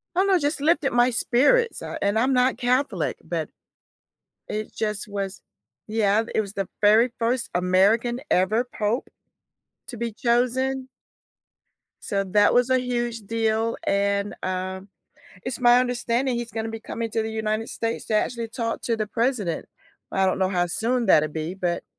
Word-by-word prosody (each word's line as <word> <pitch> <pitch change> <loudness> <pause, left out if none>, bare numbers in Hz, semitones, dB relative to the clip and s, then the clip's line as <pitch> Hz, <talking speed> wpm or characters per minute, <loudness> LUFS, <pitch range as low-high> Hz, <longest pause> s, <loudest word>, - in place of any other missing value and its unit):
I - - +2
don't 395 - +2
know, 380 -2 +5
just 290 0 -1
lifted 305 -2 +2
my 245 +1 +4
spirits, 290 - +2
uh, - - -5
and 205 +2 +2
I'm 260 +3 +2
not 250 +1 +3
Catholic, 255 +3 0
but - - -3 1.0
it 215 0 -4
just 210 -2 -3
was 200 -1 -4 0.5
yeah, 215 -1 +2
it 220 - +3
was 200 - -8
the 195 -2 -3
very 220 +4 +5
first 235 +1 0
American 200 +7 +2
ever 215 +7 +2
pope 215 +4 0 0.8
to 240 - -7
be 235 0 -2
chosen. 255 +3 0 1.2
So 195 0 -1
that 205 0 +5
was 245 0 +3
a 260 0 +3
huge 240 -2 -2
deal. 225 0 0
And, 200 +1 +1
um, 185 +1 -4 0.6
it's 255 -1 -4
my 245 0 +6
understanding 245 +1 0
he's 235 -1 -4
gonna 225 0 -3
be 225 0 -6
coming 230 +1 -4
to 225 0 -1
the 220 - -4
United 220 0 -2
States 230 0 -3
to 220 - -3
actually 230 +1 0
talk 230 -1 -3
to 230 - 0
the 215 -1 -2
president. 225 -7 -1 0.5
I 190 0 +2
don't 185 - +1
know 190 -1 +1
how 175 -2 +1
soon 235 +6 0
that'll 155 0 +5
be, 160 +4 -4
but 175 -2 -2
225 Hz, 165 wpm, -24 LUFS, 200-245 Hz, 1.2 s, my